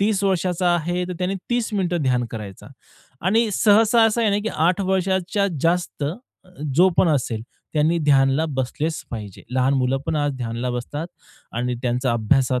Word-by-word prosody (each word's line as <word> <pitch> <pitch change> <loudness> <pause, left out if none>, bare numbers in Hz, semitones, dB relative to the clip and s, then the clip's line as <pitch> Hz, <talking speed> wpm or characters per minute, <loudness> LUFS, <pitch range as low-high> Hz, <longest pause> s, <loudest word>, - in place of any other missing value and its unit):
30 200 -1 +1
वर्षाचा 180 -1 +1
आहे, 175 +2 -1
तर - - -3
त्याने 185 +1 -1 0.2
30 240 -2 0
मिनिटं 175 -4 0
ध्यान 125 -2 +1
करायचा. 105 -4 -8 0.6
आणि 220 +3 +3
सहसा 220 +3 +4
असं 225 +1 +2
आहे 215 - +3
ना, 200 - +2
की - - 0 0.2
8 180 +3 +2
वर्षाच्या 190 +1 +1
जास्त 170 -2 0 0.7
जो 180 +6 +6
पण 180 - +5
असेल, 125 -7 0 0.3
त्यांनी 155 +3 +2
ध्यानला 140 -1 +3
बसलेच 150 +5 -2
पाहिजे. 105 -5 -7
लहान 130 +2 +2
मुलं 130 0 +1
पण 160 - 0
आज 145 -1 0
ध्यानाला 120 0 -3
बसतात 145 +6 -4 0.5
आणि 125 +1 -1
त्यांचा 125 0 0
अभ्यासात 125 +3 +2
155 Hz, 160 wpm, -22 LUFS, 125-190 Hz, 0.7 s, जो